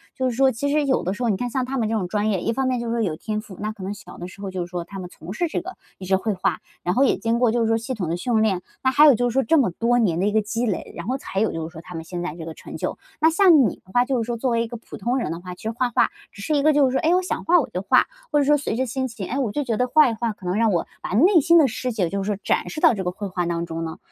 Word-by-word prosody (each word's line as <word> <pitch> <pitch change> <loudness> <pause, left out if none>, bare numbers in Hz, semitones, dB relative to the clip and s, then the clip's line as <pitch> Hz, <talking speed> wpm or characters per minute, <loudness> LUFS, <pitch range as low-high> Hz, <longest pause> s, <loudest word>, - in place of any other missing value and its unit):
就 260 0 0
是 240 - -4
说 270 0 +5
其 280 +5 -2
实 300 0 +2
有 265 -2 +1
的 185 - -1
时 205 - -8
候 240 - +1
你 205 - +2
看 245 +3 -2
像 255 +1 -1
他 270 +1 -3
们 225 -3 0
这 - - -1
种 195 -5 -1
专 210 +3 0
业， 190 -4 -1
一 230 - 0
方 265 +2 0
面 255 -1 0
就 235 - -4
是 230 - -1
说 235 - 0
有 180 -8 -1
天 215 +5 -4
赋， 200 -4 -12
那 215 +1 -2
可 210 -3 -10
能 195 +2 -3
小 180 -3 -12
的 175 - -6
时 190 +2 -13
候 195 - -4
就 185 -1 -3
是 - - -11
说 175 -1 -4
他 195 +3 -9
们 180 -1 -7
从 175 +2 -9
事 345 +10 0
这 320 - -2
个， 370 +2 -8 0.2
一 190 - -8
直 190 +1 +3
绘 205 +3 -1
画， 185 - -1 0.2
然 180 - 0
后 265 - +4
也 270 - +3
经 230 +1 0
过 245 -2 +3
就 240 +1 +1
是 225 - +2
说 225 0 +2
系 230 +3 -4
统 190 -9 -3
的 170 - -1
训 225 +3 +1
练， 195 -5 +1 0.2
那 260 - +3
还 290 +4 +6
有 285 -4 +8
就 245 +2 +1
是 - - -5
说 270 +1 +2
这 320 +8 +3
么 260 -9 +3
多 235 +6 +1
年 175 -8 +1
的 190 - +1
一 210 - +2
个 220 +1 +3
积 225 +3 -2
累， 205 -6 -3
然 170 - -6
后 260 +2 0
才 195 -7 -4
有 220 - +2
就 160 -1 -4
是 165 - -14
说 160 - -9
他 175 - -10
们 160 - -5
现 175 +1 -6
在 175 -3 -4
这 165 -2 -8
个 165 - -6
成 - - -9
就。 - - -3 0.2
那 320 +1 +5
像 330 - +6
你 - - -4
的 185 - -17
话， 245 0 +4
就 255 -2 0
是 - - -8
说 240 -1 -2
作 255 +3 -1
为 230 0 +2
一 - - -5
个 235 - -7
普 225 - -11
通 240 +5 -1
人 235 - -2
的 165 - -4
话， 180 0 -8
其 - - -16
实 220 - -2
画 245 +2 -1
画， - - +2 0.2
只 200 - -12
是 305 +9 0
一 285 - +3
个 310 +1 +5
就 290 -1 +4
是 260 - +1
说， 265 - +1
哎， 330 +1 +3
我 365 - +3
想 370 - -3
画 350 +1 +5
我 290 - -2
就 180 - -3
画， 195 - +4 0.3
或 295 - +3
者 285 - +2
说 295 +1 +4
随 275 -6 -3
着 260 +3 0
心 260 +2 -2
情， 225 -6 -7
哎， 255 - -3
我 245 -6 0
就 290 - -1
觉 235 -5 -1
得 250 - +1
画 295 +2 +5
一 - - -2
画 230 +1 -2
可 200 - -15
能 180 +1 -1
让 225 0 +3
我 170 -3 0
把 - - -5
内 330 - +5
心 335 +4 +5
的 305 -4 +6
世 250 +1 -3
界 195 -7 -1
就 195 +1 -2
是 - - -5
说 200 - -2
展 - - 0
示 310 - -5
到 - - +6
这 195 -4 -3
个 180 - -1
绘 205 +3 -6
画 180 -2 -2
当 170 0 -2
中 165 0 -5
呢？ 160 -1 -5
225 Hz, 405 characters per minute, -23 LUFS, 190-260 Hz, 0.3 s, 有